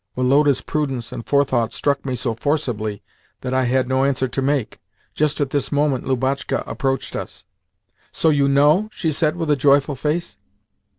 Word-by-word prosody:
Woloda's 135 +2 +3
prudence 135 -6 -3
and 115 - -6
forethought 130 -5 +1
struck 140 -1 0
me 130 - -1
so 120 -1 -2
forcibly 115 -6 -2 0.4
that 130 0 -3
I 130 0 +2
had 130 +1 +1
no 130 +1 +1
answer 135 -1 +1
to 130 +2 -3
make. 135 -3 -1 0.3
Just 150 -1 0
at 140 -2 -1
this 145 -2 -1
moment 145 -3 +1
Lubotshka 130 +1 -1
approached 135 -1 -2
us. - - -6 0.7
"So 160 - +2
you 140 -2 +2
know?" 150 +9 +4
she 160 -6 -2
said 155 +1 0
with 165 -3 -1
a - - +5
joyful 140 +1 +3
face. 150 -3 -2
140 Hz, 170 wpm, -21 LUFS, 130-145 Hz, 0.7 s, a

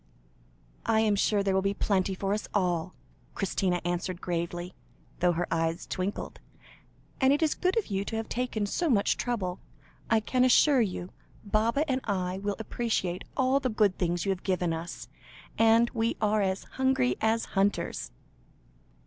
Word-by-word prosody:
"I 220 -1 +4
am 215 -2 +3
sure 200 0 +2
there 195 -1 +1
will 190 - +3
be 195 +1 0
plenty 190 -2 +1
for 195 +1 -1
us 210 - -3
all," 180 -2 0 0.4
Christina 185 -2 0
answered 175 0 -2
gravely, 175 0 -3 0.5
though 175 0 +3
her 175 +1 -1
eyes 165 0 0
twinkled; 185 +2 -4 0.8
"and 265 -1 +4
it 290 +3 +2
is 310 - +2
good 370 +3 0
of 450 - +2
you 195 -1 -2
to 225 - -4
have 225 0 -3
taken 240 -4 -2
so 335 - -1
much 205 -6 +3
trouble. 195 -7 -2 0.5
I 225 - +4
can 250 +4 +1
assure 255 +1 +5
you, 185 -4 -3 0.3
Baba 230 +8 +1
and 260 -2 0
I 185 -2 -1
will 200 0 -2
appreciate 220 -5 -2
all 265 +1 +3
the 260 - -1
good 210 -4 +2
things 175 0 0
you 195 - +2
have 190 -1 -3
given 180 -3 0
us, 165 +2 -6 0.5
and 225 +1 +5
we 230 -1 -1
are 215 0 +2
as 190 -1 -1
hungry 260 - +1
as 225 +1 +2
hunters." 200 +1 0
200 Hz, 165 wpm, -28 LUFS, 180-230 Hz, 0.8 s, assure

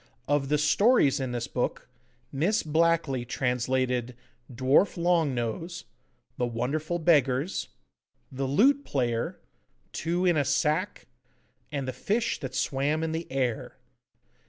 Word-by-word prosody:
Of 145 -1 +1
the 150 - +3
stories 150 - +3
in 130 -2 -3
this 120 -1 -2
book, - - -3 0.4
Miss 180 +11 +1
Blackley 160 -4 +1
translated 125 0 -1 0.4
'Dwarf 130 - +2
Long 170 -5 +2
Nose,' 145 +9 -4 0.5
'The 125 - +1
Wonderful 140 +9 -2
Beggars,' 150 -1 +2 0.6
'The 135 0 -3
Lute 265 - +3
Player,' 120 - -1 0.5
'Two 175 +3 -1
in 175 -3 +3
a 145 - +3
Sack,' 150 +7 0 0.7
and 140 -3 -3
'The 130 - -3
Fish 215 - -1
that 130 -2 -6
swam 145 +4 0
in 160 - -1
the 160 -1 -5
Air. 130 -4 -2
145 Hz, 125 wpm, -27 LUFS, 130-165 Hz, 0.7 s, the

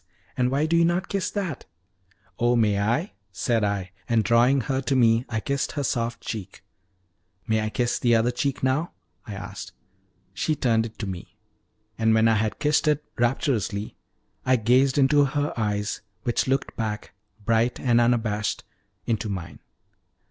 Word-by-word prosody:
And 125 -2 +1
why 140 +4 +1
do 165 +2 +1
you 170 - +5
not 175 +2 0
kiss 195 -2 -1
that?" 185 -9 -4 0.7
"Oh, 120 +1 +3
may 105 -4 +2
I?" 120 - 0 0.2
said 110 +5 0
I, 100 -3 -1 0.2
and 115 -2 +3
drawing 120 +5 +4
her 135 +1 -1
to 135 +1 0
me 115 -1 +4
I 110 -2 -1
kissed 140 +5 -2
her 145 - -2
soft 120 -2 -1
cheek. 100 -4 -7 0.8
"May 110 0 +1
I 110 - -1
kiss 120 +2 0
the 120 -2 +3
other 115 +2 +2
cheek 135 +3 -2
now?" 135 +6 0 0.3
I 105 - -6
asked. 100 -3 -8 0.6
She 155 +10 0
turned 115 -4 +1
it 110 - -16
to 110 - -4
me, 95 -3 -7 0.6
and 110 0 +3
when 110 0 +4
I 115 - +4
had 110 0 -1
kissed 150 +1 +1
it 150 0 +2 0.2
rapturously, 115 - 0 0.5
I 130 - +3
gazed 130 +4 +3
into 145 +1 +5
her 145 +1 -1
eyes, 105 -2 -2 0.2
which 120 0 0
looked 135 +1 -1
back, 110 -2 -4 0.3
bright 115 +2 +2
and 120 -2 +3
unabashed, 110 -3 0 0.4
into 110 -2 -1
mine. 90 -5 -6
120 Hz, 165 wpm, -25 LUFS, 110-135 Hz, 0.8 s, you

